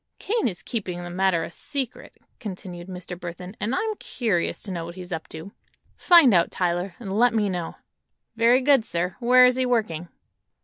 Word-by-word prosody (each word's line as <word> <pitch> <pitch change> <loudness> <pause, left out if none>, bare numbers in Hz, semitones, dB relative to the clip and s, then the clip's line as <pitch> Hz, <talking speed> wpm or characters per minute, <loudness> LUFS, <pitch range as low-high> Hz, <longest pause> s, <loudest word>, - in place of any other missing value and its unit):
"Kane 450 - 0
is 180 -5 -5
keeping 185 -6 -4
the 175 - -7
matter 185 -2 +1
a - - -6
secret," 270 +5 -6 0.2
continued 185 -4 -7
Mr. 180 -1 -7
Burthon, 180 +2 -8
"and 230 +5 -1
I'm 440 +5 -1
curious 205 -9 -1
to 200 - -6
know 170 -2 -3
what 170 +1 -8
he's 180 -1 -9
up 160 -1 -5
to. 160 +5 -9 0.4
Find 335 - +6
out, 170 -2 +4
Tyler, 175 0 -1
and 195 -5 -5
let 245 -1 +4
me 210 -2 +2
know." 175 -3 -4 0.6
"Very 235 +3 +4
good, 275 -3 +4
sir. 175 -3 -2
Where 250 +1 +6
is 250 0 +3
he 260 - +1
working?" 210 -9 -1
190 Hz, 185 wpm, -24 LUFS, 175-240 Hz, 0.6 s, Find